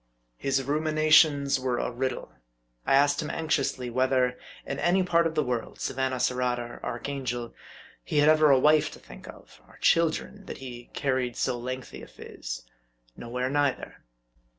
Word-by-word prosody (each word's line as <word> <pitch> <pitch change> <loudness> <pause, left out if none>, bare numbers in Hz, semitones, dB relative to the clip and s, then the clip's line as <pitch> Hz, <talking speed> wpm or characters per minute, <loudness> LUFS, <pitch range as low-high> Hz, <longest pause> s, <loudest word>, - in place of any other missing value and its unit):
His 135 0 0
ruminations 155 -1 +3
were 130 -2 -1
a - - -2
riddle. 130 +1 -3 0.6
I - - +5
asked 145 +2 +3
him 150 - -5
anxiously, 135 -6 -1
whether, 130 0 +2 0.3
in 140 - -4
any 175 +4 +2
part 170 -2 +3
of 160 - -6
the 150 - +2
world, 125 -3 -4
Savannah, 130 0 -2
Surat, 125 0 0
or 120 0 -7
Archangel, 120 -1 -4 0.5
he 150 - -3
had 145 0 +5
ever 155 -1 +5
a 135 - +6
wife 150 +3 +4
to - - -12
think - - -13
of; - - -14
or - - -18
children, 170 +4 +1
that - - -6
he 120 -2 -9
carried 130 -4 -1
so 130 - 0
lengthy 130 +1 -6
a - - -11
phiz. - - -8 0.5
Nowhere 125 +2 -3
neither. 145 -2 -1
135 Hz, 160 wpm, -27 LUFS, 125-150 Hz, 0.6 s, a